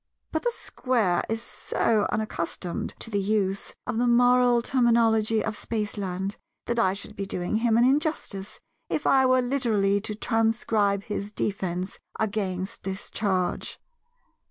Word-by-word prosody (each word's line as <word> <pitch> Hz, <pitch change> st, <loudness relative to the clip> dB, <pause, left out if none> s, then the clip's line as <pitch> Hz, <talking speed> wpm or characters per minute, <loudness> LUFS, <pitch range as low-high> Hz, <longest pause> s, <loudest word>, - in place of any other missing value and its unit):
But 315 Hz, -, -1 dB
the 485 Hz, -, +1 dB
Square 225 Hz, -9 st, 0 dB
is 225 Hz, +1 st, -2 dB
so 225 Hz, -2 st, 0 dB
unaccustomed 180 Hz, -4 st, -3 dB
to 230 Hz, -, -4 dB
the 205 Hz, -, +1 dB
use 195 Hz, -1 st, -1 dB
of 225 Hz, -, -2 dB
the 245 Hz, -, +2 dB
moral 245 Hz, 0 st, +5 dB
terminology 230 Hz, -3 st, +3 dB
of 215 Hz, -, -2 dB
Spaceland 200 Hz, -4 st, -3 dB, 0.3 s
that 235 Hz, 0 st, 0 dB
I 190 Hz, -4 st, +3 dB
should 200 Hz, -, -8 dB
be 195 Hz, 0 st, -4 dB
doing 180 Hz, +3 st, -1 dB
him 225 Hz, 0 st, +2 dB
an 235 Hz, -, +5 dB
injustice 265 Hz, -8 st, 0 dB, 0.3 s
if 300 Hz, -, -1 dB
I 265 Hz, -1 st, +5 dB
were 255 Hz, 0 st, +4 dB
literally 215 Hz, -6 st, +1 dB
to 210 Hz, 0 st, -4 dB
transcribe 220 Hz, -3 st, +1 dB
his 205 Hz, -1 st, -4 dB
defence 185 Hz, -3 st, -2 dB, 0.2 s
against 200 Hz, -1 st, -2 dB
this 190 Hz, +1 st, -5 dB
charge. 185 Hz, -4 st, -1 dB
215 Hz, 140 wpm, -26 LUFS, 195-235 Hz, 0.3 s, moral